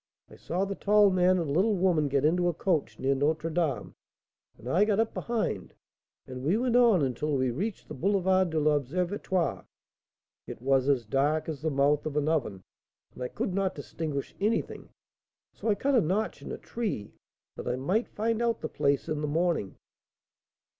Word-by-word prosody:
I -, -, -12 dB
saw 185 Hz, +3 st, -2 dB
the 195 Hz, -, -3 dB
tall 205 Hz, 0 st, +4 dB
man 185 Hz, 0 st, +3 dB
and 170 Hz, -3 st, -1 dB
little 200 Hz, +8 st, +2 dB
woman 175 Hz, -5 st, +2 dB
get 140 Hz, 0 st, +1 dB
into 175 Hz, +3 st, +2 dB
a 175 Hz, -, 0 dB
coach 155 Hz, -, -1 dB
near 135 Hz, +1 st, +1 dB
Notre 155 Hz, +4 st, 0 dB
Dame, 155 Hz, -5 st, -1 dB, 0.6 s
and 120 Hz, -, -12 dB
I 175 Hz, +10 st, +3 dB
got 210 Hz, -1 st, +1 dB
up 225 Hz, 0 st, +1 dB
behind, 235 Hz, -2 st, -3 dB, 0.5 s
and 130 Hz, 0 st, -8 dB
we 170 Hz, +9 st, +2 dB
went 245 Hz, 0 st, 0 dB
on 230 Hz, -10 st, +5 dB
until 140 Hz, +3 st, -1 dB
we 130 Hz, -1 st, +1 dB
reached 200 Hz, -, -4 dB
the -, -, -7 dB
Boulevard 190 Hz, +2 st, +2 dB
de 160 Hz, -1 st, 0 dB
l'Observatoire. 170 Hz, +5 st, 0 dB, 0.8 s
It -, -, -7 dB
was 135 Hz, +2 st, +2 dB
as 130 Hz, -5 st, +2 dB
dark 145 Hz, +7 st, +1 dB
as 155 Hz, -3 st, -5 dB
the 160 Hz, -, 0 dB
mouth 145 Hz, +1 st, +2 dB
of 150 Hz, -1 st, -3 dB
an 150 Hz, 0 st, +1 dB
oven, 120 Hz, -12 st, -1 dB, 0.5 s
and -, -, -12 dB
I 125 Hz, -, -1 dB
could 180 Hz, -, -3 dB
not 195 Hz, 0 st, 0 dB
distinguish 145 Hz, -1 st, -5 dB
anything, 215 Hz, +3 st, -1 dB, 0.6 s
so -, -, -6 dB
I 210 Hz, -, +3 dB
cut 280 Hz, +6 st, 0 dB
a 245 Hz, -, +5 dB
notch 200 Hz, +6 st, -1 dB
in -, -, -7 dB
a -, -, -4 dB
tree, 205 Hz, -, -4 dB, 0.4 s
that -, -, -7 dB
I 125 Hz, -, 0 dB
might 180 Hz, -, 0 dB
find 225 Hz, +2 st, -1 dB
out 235 Hz, -1 st, 0 dB
the -, -, -3 dB
place 140 Hz, 0 st, 0 dB
in 155 Hz, -2 st, -2 dB
the 150 Hz, -, -1 dB
morning." 160 Hz, -, 0 dB
165 Hz, 190 wpm, -28 LUFS, 140-195 Hz, 0.8 s, on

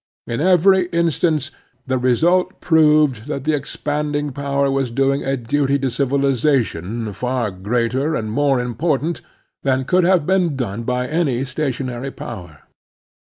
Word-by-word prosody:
In 115 Hz, +4 st, -3 dB
every 185 Hz, +1 st, +4 dB
instance 165 Hz, -4 st, 0 dB, 0.3 s
the 130 Hz, -2 st, 0 dB
result 165 Hz, +9 st, +2 dB
proved 150 Hz, -7 st, +3 dB
that 135 Hz, -, -4 dB
the 155 Hz, +2 st, +1 dB
expanding 145 Hz, 0 st, -2 dB
power 140 Hz, 0 st, -1 dB
was 135 Hz, -2 st, 0 dB
doing 135 Hz, +3 st, +1 dB
a 135 Hz, 0 st, -1 dB
duty 140 Hz, +3 st, 0 dB
to 135 Hz, -2 st, -2 dB
civilization 125 Hz, -, 0 dB
far 125 Hz, +1 st, -2 dB
greater 120 Hz, +10 st, -1 dB
and 110 Hz, -4 st, -3 dB
more 140 Hz, +2 st, +2 dB
impor 125 Hz, +5 st, 0 dB
tant 165 Hz, +3 st, -3 dB, 0.4 s
than 130 Hz, -1 st, 0 dB
could 180 Hz, +5 st, +3 dB
have 175 Hz, -3 st, +3 dB
been 180 Hz, -4 st, +1 dB
done 115 Hz, -4 st, -3 dB
by 125 Hz, +1 st, -1 dB
any 140 Hz, -5 st, 0 dB
stationary 130 Hz, -2 st, -3 dB
power. 90 Hz, -, -9 dB
135 Hz, 140 wpm, -20 LUFS, 125-150 Hz, 0.4 s, every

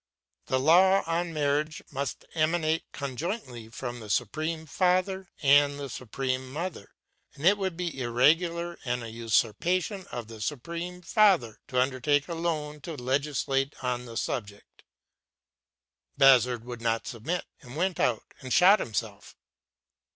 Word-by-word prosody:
The 130 Hz, -, +1 dB
law 185 Hz, +7 st, +5 dB
on 170 Hz, +1 st, -1 dB
marriage 150 Hz, 0 st, -1 dB
must 140 Hz, 0 st, -4 dB
emanate 160 Hz, 0 st, 0 dB
conjointly 135 Hz, -, -5 dB
from 120 Hz, +1 st, -6 dB
the 110 Hz, -2 st, -10 dB
Supreme 155 Hz, +9 st, -1 dB
Father 185 Hz, +3 st, +1 dB
and 145 Hz, 0 st, +5 dB
the 140 Hz, -2 st, -5 dB
Supreme 130 Hz, +1 st, -3 dB
Mother, 160 Hz, -, -6 dB, 0.4 s
and 145 Hz, -, -6 dB
it 195 Hz, +3 st, +7 dB
would 190 Hz, -4 st, -3 dB
be 175 Hz, -6 st, -3 dB
irregular 165 Hz, +8 st, +2 dB
and 125 Hz, -1 st, -2 dB
a 115 Hz, -, -7 dB
usurpation 120 Hz, -, 0 dB
for 120 Hz, -, -6 dB
the 110 Hz, -1 st, -11 dB
Supreme 170 Hz, +8 st, -4 dB
Father 175 Hz, -, +3 dB
to 125 Hz, -, 0 dB
undertake 135 Hz, +2 st, +1 dB
alone 160 Hz, -3 st, -3 dB
to 165 Hz, +2 st, -6 dB
legislate 135 Hz, +1 st, -1 dB
on 125 Hz, -1 st, -2 dB
the 115 Hz, -1 st, -7 dB
subject. 100 Hz, -5 st, -5 dB, 1.4 s
Bazard 125 Hz, -4 st, +5 dB
would 120 Hz, -1 st, -7 dB
not 115 Hz, -1 st, 0 dB
submit, 150 Hz, +10 st, -3 dB, 0.2 s
and 125 Hz, -2 st, -11 dB
went 180 Hz, +2 st, -1 dB
out 120 Hz, -3 st, +1 dB, 0.2 s
and 130 Hz, -, -8 dB
shot 195 Hz, +7 st, +6 dB
himself. 110 Hz, -, -4 dB
145 Hz, 135 wpm, -28 LUFS, 125-170 Hz, 1.4 s, it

